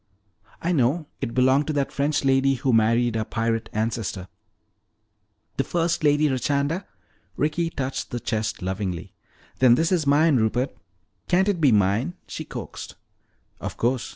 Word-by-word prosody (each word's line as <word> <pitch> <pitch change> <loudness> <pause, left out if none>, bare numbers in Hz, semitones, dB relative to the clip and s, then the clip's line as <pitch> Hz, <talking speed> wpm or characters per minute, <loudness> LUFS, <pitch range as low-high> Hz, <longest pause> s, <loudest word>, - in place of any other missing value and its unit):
I 170 - +1
know, 150 +1 +1 0.2
it 115 - -3
belonged 130 +3 +3
to 155 - -1
that 140 -2 -1
French 145 0 0
lady 135 0 +3
who 130 0 0
married 115 +1 +3
our 110 - 0
pirate 115 0 -2
ancestor." 105 -4 -3 1.3
"The - - +2
first 170 -1 -1
Lady 145 0 +4
Richanda!" 140 +6 0 0.5
Ricky 165 +3 0
touched 135 -4 -4
the 120 - -3
chest 110 -5 -3
lovingly. 95 -2 -4 0.5
"Then 125 -2 +6
this 165 +6 +1
is 165 -6 +1
mine, 145 0 +4
Rupert. 120 +4 0 0.5
Can't 190 +2 +3
it 185 -5 -1
be 140 -4 +5
mine?" 105 - +2
she - - -6
coaxed. - - -8 0.6
"Of - - -6
course. 125 +1 0
130 Hz, 150 wpm, -24 LUFS, 115-150 Hz, 1.3 s, Then